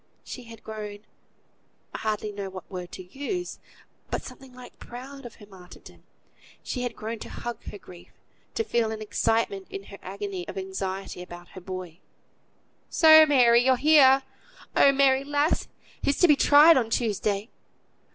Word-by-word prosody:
She 250 - -9
had 230 -1 -13
grown 210 -1 -8 0.9
I - - -5
hardly 215 -1 -2
know 200 -1 -6
what 185 -1 -10
word 180 -1 -7
to 185 - -8
use 285 - -5 0.5
but, - - -3
something 260 0 -12
like 250 0 -14
proud 260 +2 -9
of 235 - -15
her 210 - -15
martyrdom; 185 -3 -15 0.6
she 250 - -4
had 245 -2 -3
grown 220 +1 -6
to - - -9
hug 240 0 -7
her - - -8
grief; 175 -3 -15 0.5
to 450 - 0
feel 235 - 0
an 220 - -5
excitement 205 -2 -1
in 195 - -7
her 200 0 -12
agony 195 -2 -6
of - - -8
anxiety 190 -1 -5
about 175 -1 -11
her 185 - -11
boy. 185 -2 -7 0.9
"So, 315 -1 +7
Mary, 245 -4 +5
you're 260 0 +4
here! 270 -1 +5 0.5
Oh! 280 - +6
Mary, 270 -1 +3
lass! 290 +2 0 0.3
He's 280 - 0
to 355 - +7
be 300 - +6
tried 295 +3 +7
on 235 -3 0
Tuesday." 210 -2 -1
225 Hz, 160 wpm, -26 LUFS, 195-270 Hz, 0.9 s, So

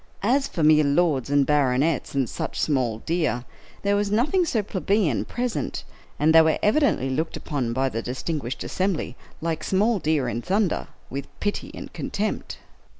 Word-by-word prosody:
As 270 +6 +2
for 165 - -3
mere 155 0 +6
lords 140 -3 +2
and 145 -1 +3
baronets, 145 +1 +1
and 135 -3 +1
such - - -4
small 125 -7 0
deer, 155 -8 0 0.4
there 200 0 +2
was 205 0 0
nothing 285 - +2
so 225 -9 0
plebeian 195 - 0
present, 245 -1 -3 0.3
and 155 +2 +3
they 165 - +9
were 160 0 +3
evidently 215 - +2
looked 160 +5 -2
upon 130 -6 -2
by 130 +3 +1
the 115 -3 -3
distinguished 130 +1 -4
assembly, 185 -9 -1 0.3
like 160 -1 -2
small 205 +3 +2
deer 150 -5 +1
in 120 0 -2
thunder, 195 - 0 0.2
with 140 +1 -4
pity 205 - -2
and - - -9
contempt. - - -3
155 Hz, 160 wpm, -24 LUFS, 135-200 Hz, 0.4 s, they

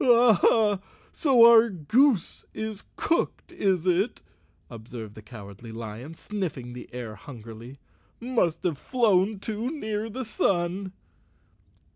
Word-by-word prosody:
"Aha, 225 -4 +4 0.3
so 260 -7 +5
our 235 0 +7
goose 215 - +1
is 220 -2 -5
cooked, 335 - -1
is 185 -4 0
it?" 190 +5 0 0.4
observed 110 -1 -9
the 110 - -11
Cowardly 105 0 -11
Lion, 115 +7 -8
sniffing 160 -13 -5
the 125 - -10
air 120 -3 -6
hungrily. 115 +2 -11 0.3
" - - -38
Must 235 -9 0
have 165 -6 -1
flown 215 -5 +2
too 220 +4 -4
near 220 -7 -3
the 255 +4 -5
sun." 190 -2 -1
190 Hz, 120 wpm, -26 LUFS, -, 0.4 s, our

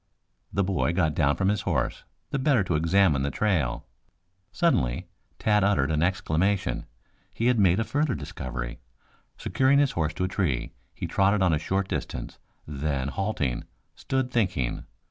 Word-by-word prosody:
The 100 - +1
boy 90 -3 0
got 85 -4 +1
down 70 -3 +2
from 95 0 +1
his 105 -2 0
horse - - -1 0.3
the 140 - 0
better 130 -6 +3
to 90 - -2
examine 80 -2 +3
the 70 - 0
trail. 75 - 0 0.7
Suddenly 130 - +1 0.3
Tad 105 -2 +2
uttered 95 -8 +2
an 75 -1 +1
exclamation. 90 +2 0 0.5
He 115 - -1
had 125 -2 +3
made 95 -1 +4
a - - +2
further 145 +2 0
discovery. - - -6 0.6
Securing 135 +1 +2
his 140 -2 +3
horse 80 -2 -1
to 90 - -2
a - - +1
tree, 85 -10 -1 0.2
he - - -4
trotted 100 0 +2
on 90 -3 +3
a 75 - +1
short 95 +4 -1
distance, - - -5 0.3
then 70 -2 -2
halting, 75 - -2 0.3
stood 130 -1 -2
thinking. 95 - 0
95 Hz, 160 wpm, -26 LUFS, 75-105 Hz, 0.7 s, made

